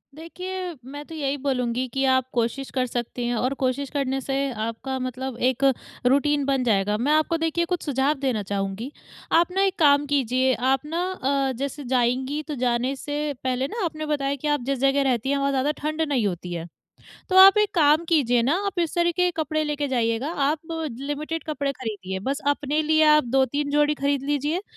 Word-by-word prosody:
देखिए, 365 Hz, +3 st, -6 dB
मैं 285 Hz, +2 st, -8 dB
तो 325 Hz, -, -9 dB
यही 285 Hz, -2 st, -1 dB
बोलूँगी 250 Hz, -1 st, 0 dB
कि 270 Hz, -, 0 dB
आप 260 Hz, -1 st, +3 dB
कोशिश 245 Hz, +3 st, -1 dB
कर 255 Hz, -1 st, 0 dB
सकती 240 Hz, 0 st, -4 dB
हैं 240 Hz, -, 0 dB
और 255 Hz, +4 st, 0 dB
कोशिश 260 Hz, +2 st, -1 dB
करने 270 Hz, -2 st, -1 dB
से 270 Hz, +1 st, -3 dB, 0.2 s
आपका 230 Hz, +4 st, -4 dB
मतलब 255 Hz, 0 st, -4 dB
एक 260 Hz, +1 st, -1 dB, 0.4 s
रूटीन 285 Hz, +3 st, +3 dB
बन 270 Hz, -2 st, +1 dB
जाएगा। 210 Hz, -2 st, +1 dB
मैं 270 Hz, +6 st, 0 dB
आपको 310 Hz, +2 st, +2 dB
देखिए 325 Hz, +1 st, 0 dB
कुछ 355 Hz, 0 st, -2 dB
सुझाव 275 Hz, 0 st, +1 dB
देना 255 Hz, -7 st, -1 dB
चाहूँगी। 200 Hz, +5 st, -3 dB, 0.4 s
आप 340 Hz, +2 st, +4 dB
ना, 385 Hz, +2 st, 0 dB
एक 390 Hz, -1 st, +2 dB
काम 285 Hz, -2 st, +5 dB
कीजिए 260 Hz, -2 st, +1 dB, 0.2 s
आप 270 Hz, +2 st, -2 dB
ना, 330 Hz, +3 st, -2 dB
अ, 275 Hz, -5 st, 0 dB
जैसे 280 Hz, +2 st, -4 dB
जाएँगी 260 Hz, +4 st, 0 dB
तो 300 Hz, -, -4 dB
जाने 245 Hz, +3 st, 0 dB
से 290 Hz, +1 st, -3 dB
पहले 260 Hz, +1 st, 0 dB
ना, 435 Hz, +5 st, -4 dB
आपने 310 Hz, -2 st, -4 dB
बताया 280 Hz, -2 st, -1 dB
कि 300 Hz, -, 0 dB
आप 295 Hz, -3 st, +1 dB
जिस 275 Hz, -1 st, -1 dB
जगह 275 Hz, +1 st, +3 dB
रहती 245 Hz, +1 st, 0 dB
हैं, 280 Hz, -, +2 dB
वहाँ 275 Hz, 0 st, +1 dB
ज़्यादा 275 Hz, +2 st, +1 dB
ठंड 310 Hz, +1 st, -2 dB
नहीं 275 Hz, -9 st, +1 dB
होती 180 Hz, -1 st, -5 dB
है। 170 Hz, 0 st, -5 dB, 0.6 s
तो 375 Hz, -, +1 dB
आप 390 Hz, +2 st, +9 dB
एक 420 Hz, 0 st, +1 dB
काम 310 Hz, 0 st, +4 dB
कीजिए 245 Hz, -8 st, +3 dB
ना, 280 Hz, +8 st, +2 dB
आप 390 Hz, -2 st, -3 dB
इस 335 Hz, -2 st, -1 dB
तरीक़े 345 Hz, +1 st, +2 dB
के 360 Hz, -, +2 dB
कपड़े 310 Hz, 0 st, -1 dB
लेके 295 Hz, -1 st, -2 dB
जाइएगा। 235 Hz, +1 st, 0 dB, 0.2 s
आप 310 Hz, -, -1 dB, 0.4 s
लिमिटेड 300 Hz, +3 st, -4 dB
कपड़े 285 Hz, -3 st, -2 dB
खरीदिए। 205 Hz, -7 st, -5 dB
बस 275 Hz, +1 st, -1 dB
अपने 290 Hz, +1 st, 0 dB
लिए 315 Hz, +1 st, +3 dB
आप 300 Hz, -, +2 dB
2-3 270 Hz, +3 st, 0 dB
जोड़ी 295 Hz, +1 st, +3 dB
खरीद 280 Hz, -1 st, 0 dB
लीजिए, 295 Hz, +6 st, -1 dB
275 Hz, 200 wpm, -24 LUFS, 255-305 Hz, 0.6 s, आप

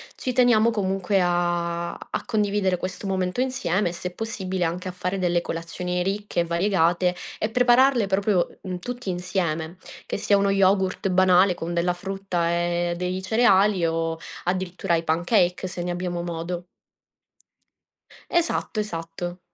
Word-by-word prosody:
ci 255 Hz, -, -3 dB
teniamo, 240 Hz, -3 st, +4 dB
comunque, 195 Hz, -2 st, 0 dB
a 175 Hz, -1 st, 0 dB
a -, -, -6 dB
condividere 205 Hz, -4 st, +1 dB
questo 185 Hz, +2 st, -5 dB
momento 185 Hz, +4 st, -1 dB
insieme, 230 Hz, -8 st, 0 dB
e -, -, -5 dB
se 180 Hz, +1 st, -4 dB
è -, -, -17 dB
possibile 190 Hz, -5 st, -3 dB
anche 180 Hz, +3 st, -2 dB
a -, -, -3 dB
fare 180 Hz, +1 st, -3 dB
delle 175 Hz, -1 st, +1 dB
colazioni 180 Hz, +2 st, -3 dB
ricche 195 Hz, -1 st, -1 dB
e -, -, -1 dB
variegate 175 Hz, 0 st, +2 dB, 0.3 s
e 215 Hz, -, 0 dB
prepararle 245 Hz, -1 st, +4 dB
proprio, 195 Hz, -1 st, +1 dB
mhmm, 185 Hz, -2 st, -5 dB
tutti 245 Hz, 0 st, -5 dB
insieme, 175 Hz, -2 st, -2 dB, 0.3 s
che -, -, -3 dB
sia 205 Hz, 0 st, +3 dB
uno 200 Hz, 0 st, +2 dB
yogurt 195 Hz, -1 st, +2 dB
banale 185 Hz, 0 st, +5 dB
con 170 Hz, +1 st, -4 dB
della 175 Hz, +1 st, +1 dB
frutta 190 Hz, -2 st, -2 dB
e 175 Hz, 0 st, 0 dB
dei 180 Hz, +1 st, -2 dB
cereali, 195 Hz, -1 st, +4 dB, 0.2 s
o 165 Hz, 0 st, -1 dB, 0.3 s
addirittura 180 Hz, -1 st, -1 dB
i 165 Hz, -, -1 dB
pancakes, 175 Hz, +3 st, +1 dB
se 175 Hz, -1 st, -5 dB
ne 180 Hz, -, -3 dB
abbiamo 175 Hz, -1 st, -3 dB
modo. 175 Hz, +1 st, -4 dB, 1.7 s
Esatto, 335 Hz, -9 st, 0 dB
esatto. 175 Hz, -2 st, -5 dB
180 Hz, 145 wpm, -24 LUFS, 175-200 Hz, 1.7 s, banale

